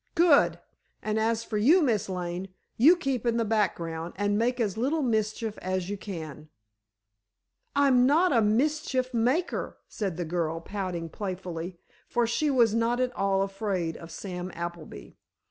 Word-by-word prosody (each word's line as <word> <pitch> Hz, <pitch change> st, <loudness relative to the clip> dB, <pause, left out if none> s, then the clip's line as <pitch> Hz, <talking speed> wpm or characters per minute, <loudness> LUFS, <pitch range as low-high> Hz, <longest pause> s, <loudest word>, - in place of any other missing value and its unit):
"Good! 335 Hz, -4 st, +5 dB, 0.5 s
And 215 Hz, 0 st, 0 dB
as 225 Hz, +1 st, +1 dB
for 215 Hz, -2 st, -2 dB
you, 315 Hz, -, +5 dB
Miss 220 Hz, -8 st, +1 dB
Lane, 180 Hz, 0 st, -4 dB, 0.3 s
you 305 Hz, +10 st, +7 dB
keep 275 Hz, -9 st, -2 dB
in 235 Hz, -1 st, +1 dB
the 230 Hz, -, +1 dB
background, 170 Hz, -6 st, -1 dB
and 205 Hz, +1 st, 0 dB
make 245 Hz, +4 st, +1 dB
as 210 Hz, -5 st, 0 dB
little 280 Hz, +7 st, 0 dB
mischief 220 Hz, -2 st, -1 dB
as 185 Hz, 0 st, -2 dB
you -, -, -1 dB
can." 155 Hz, -6 st, -7 dB, 1.3 s
"I'm 265 Hz, -3 st, +5 dB
not 325 Hz, +4 st, +4 dB
a 230 Hz, -, +4 dB
mischief 255 Hz, +3 st, +1 dB
maker," 255 Hz, +10 st, 0 dB
said 195 Hz, -6 st, -4 dB
the 175 Hz, -, -2 dB
girl, 165 Hz, -1 st, -1 dB
pouting 180 Hz, -2 st, -4 dB
playfully, 180 Hz, -2 st, -5 dB, 0.3 s
for 240 Hz, -1 st, +1 dB
she 295 Hz, +6 st, 0 dB
was 240 Hz, -6 st, +4 dB
not 230 Hz, +2 st, +1 dB
at 255 Hz, -1 st, 0 dB
all 195 Hz, 0 st, +1 dB
afraid 195 Hz, -4 st, -2 dB
of 165 Hz, -, -10 dB
Sam 180 Hz, +1 st, -6 dB
Appleby. 170 Hz, -1 st, -7 dB
215 Hz, 155 wpm, -27 LUFS, 180-245 Hz, 1.3 s, you